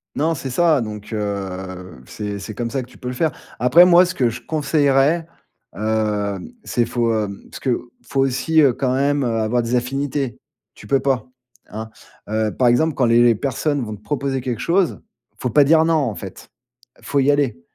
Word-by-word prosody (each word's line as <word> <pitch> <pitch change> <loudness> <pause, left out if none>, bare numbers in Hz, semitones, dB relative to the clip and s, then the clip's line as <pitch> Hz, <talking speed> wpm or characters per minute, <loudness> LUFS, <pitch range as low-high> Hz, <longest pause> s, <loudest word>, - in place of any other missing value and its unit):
Non, 160 +3 +1
c'est 135 -3 -5
ça! 160 +2 +3
Donc, 105 -2 -6
heu, 95 -3 -4
c'est 105 -1 -5
c'est 110 +2 -7
comme 120 -1 -3
ça 135 +1 -2
que 125 - -10
tu 125 - -18
peux 125 - -6
le - - -4
faire. 155 +5 0 0.3
Après, 125 +9 +7
moi, 180 0 +6
ce 185 - -5
que 125 -7 +2
je 115 - -7
conseillerais, 150 +1 +2 0.5
hem, 105 - -2
c'est 120 - 0
faut 115 -1 0
hem, 105 -3 -3
parce - - -9
que, 125 -2 -2
faut 135 - -1
aussi, 135 +5 +2
heu, 140 - +5
quand 130 +1 -1
même, 140 +1 +1
heu, - - +1
avoir 110 +3 +1
des 115 +2 -1
affinités. 135 +1 -2 0.4
Tu - - -14
peux 135 -1 +2
pas, 130 -5 0 0.4
hein, 110 +1 -6 0.4
heu, 110 0 -1
par 125 -2 +3
exemple, 155 +5 +2
quand 125 - +2
les 115 +1 +4
les 120 -1 +5
personnes 140 +4 -1
vont 110 -2 -5
te - - -23
proposer 135 +1 -2
quelque 125 -3 -3
chose, 180 +1 +1 0.3
il - - -41
faut 125 - -1
pas 145 +3 +5
dire 160 +2 +5
non 165 0 +2
en 135 -9 0
fait. 95 -2 -9 0.5
Faut 140 - -1
y 135 +1 +3
aller! 140 -11 +1
125 Hz, 205 wpm, -20 LUFS, 110-145 Hz, 0.5 s, Après